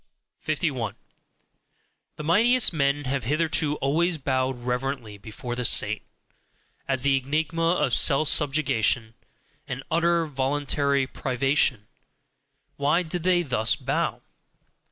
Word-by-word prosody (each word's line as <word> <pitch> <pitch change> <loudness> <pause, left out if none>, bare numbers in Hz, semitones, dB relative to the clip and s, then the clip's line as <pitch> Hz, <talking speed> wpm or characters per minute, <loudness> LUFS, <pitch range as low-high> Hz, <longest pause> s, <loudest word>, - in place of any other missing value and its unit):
51. - - -2 1.2
The 150 - -7
mightiest 225 +8 +4
men 145 -1 0
have 130 -2 -3
hitherto 150 +1 0
always 160 +5 0
bowed 130 -3 -2
reverently 125 -4 -3
before 115 +4 -7
the 125 - -3
saint, 110 -2 +2 0.9
as 135 -2 0
the 140 -1 +3
enigma 160 +5 0
of 150 -8 0
self 145 +2 +4
subjugation 135 -7 +1 0.5
and 130 +1 -5
utter 170 0 +2
voluntary 140 0 0
privation 130 -3 0 0.9
why 150 +5 +1
did 175 +1 -4
they 175 0 +2
thus 120 -7 +1
bow? - - -2
140 Hz, 110 wpm, -25 LUFS, 130-155 Hz, 1.2 s, mightiest